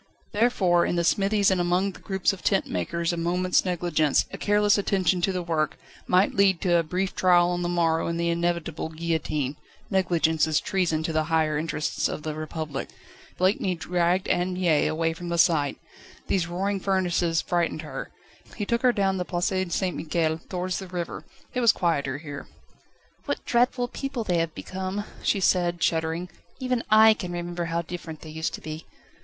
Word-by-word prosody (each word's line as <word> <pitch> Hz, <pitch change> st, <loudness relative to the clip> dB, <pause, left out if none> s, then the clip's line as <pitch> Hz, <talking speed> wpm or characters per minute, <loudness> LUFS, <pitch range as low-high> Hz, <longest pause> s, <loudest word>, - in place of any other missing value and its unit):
Therefore 195 Hz, -6 st, +3 dB
in -, -, 0 dB
the 170 Hz, -, +1 dB
smithies 200 Hz, +3 st, +3 dB
and 185 Hz, -1 st, +2 dB
among 180 Hz, +3 st, +1 dB
the -, -, -14 dB
groups 190 Hz, 0 st, 0 dB
of 195 Hz, -, -9 dB
tent 195 Hz, -2 st, +2 dB
makers 165 Hz, -, -2 dB
a -, -, -3 dB
moment's 180 Hz, +2 st, +1 dB
negligence, 175 Hz, -4 st, +1 dB
a -, -, -4 dB
careless 205 Hz, 0 st, +3 dB
attention 190 Hz, -3 st, +1 dB
to 195 Hz, -, +2 dB
the 180 Hz, -1 st, -2 dB
work, 155 Hz, -3 st, -1 dB, 0.3 s
might 185 Hz, +2 st, +3 dB
lead 195 Hz, -3 st, +3 dB
to 175 Hz, -3 st, +3 dB
a -, -, +4 dB
brief 180 Hz, +4 st, -2 dB
trial 175 Hz, -1 st, +4 dB
on 175 Hz, 0 st, -1 dB
the 175 Hz, -, -1 dB
morrow 165 Hz, -2 st, +1 dB
and 170 Hz, 0 st, -2 dB
the 170 Hz, 0 st, +1 dB
inevitable 170 Hz, -2 st, -2 dB
guillotine. 155 Hz, -4 st, -2 dB, 0.3 s
Negligence 170 Hz, -4 st, +2 dB
is 155 Hz, -2 st, +2 dB
treason 170 Hz, -4 st, 0 dB
to 160 Hz, -, -2 dB
the 155 Hz, 0 st, +1 dB
higher 160 Hz, -1 st, +1 dB
interests 155 Hz, 0 st, -1 dB
of 150 Hz, -, -5 dB
the 155 Hz, -, -3 dB
Republic. 155 Hz, -2 st, -5 dB, 0.5 s
Blakeney 185 Hz, 0 st, +1 dB
dragged 175 Hz, +3 st, 0 dB
Anne 180 Hz, +1 st, +1 dB
Mie 175 Hz, -5 st, +2 dB
away 165 Hz, +1 st, 0 dB
from 175 Hz, +1 st, -7 dB
the 170 Hz, -, -1 dB
sight. 155 Hz, -4 st, +3 dB, 0.5 s
These 180 Hz, -4 st, 0 dB
roaring 195 Hz, +3 st, -1 dB
furnaces 180 Hz, -3 st, +1 dB
frightened 170 Hz, -3 st, -1 dB
her; 155 Hz, -, -6 dB, 0.5 s
he 205 Hz, -, -3 dB
took 235 Hz, +3 st, 0 dB
her 255 Hz, -2 st, +5 dB
down 195 Hz, -4 st, +1 dB
the 180 Hz, -, -1 dB
Place 175 Hz, +1 st, -1 dB, 0.2 s
St 185 Hz, -2 st, -1 dB
Michel, 160 Hz, 0 st, -1 dB
towards 185 Hz, 0 st, -2 dB
the 190 Hz, -, -7 dB
river. 175 Hz, -2 st, -5 dB, 0.3 s
It 250 Hz, -, 0 dB
was 230 Hz, -2 st, +6 dB
quieter 145 Hz, -7 st, 0 dB
here. 145 Hz, -2 st, -8 dB, 0.8 s
"What -, -, -3 dB
dreadful 245 Hz, +1 st, +2 dB
people 275 Hz, -1 st, -4 dB
they 180 Hz, -5 st, +1 dB
have 165 Hz, -1 st, -2 dB
become," 190 Hz, +2 st, -4 dB, 0.2 s
she 200 Hz, -, +1 dB
said, 175 Hz, -2 st, +2 dB
shuddering; 165 Hz, +2 st, 0 dB, 0.3 s
"even 255 Hz, -2 st, -1 dB
I 220 Hz, +1 st, +8 dB
can 180 Hz, -4 st, -6 dB
remember 175 Hz, 0 st, -3 dB
how 170 Hz, 0 st, -1 dB
different 165 Hz, -2 st, -7 dB
they 155 Hz, -, -9 dB
used 160 Hz, +1 st, -3 dB
to -, -, -11 dB
be." 155 Hz, +1 st, -7 dB
175 Hz, 185 wpm, -26 LUFS, 160-190 Hz, 0.8 s, I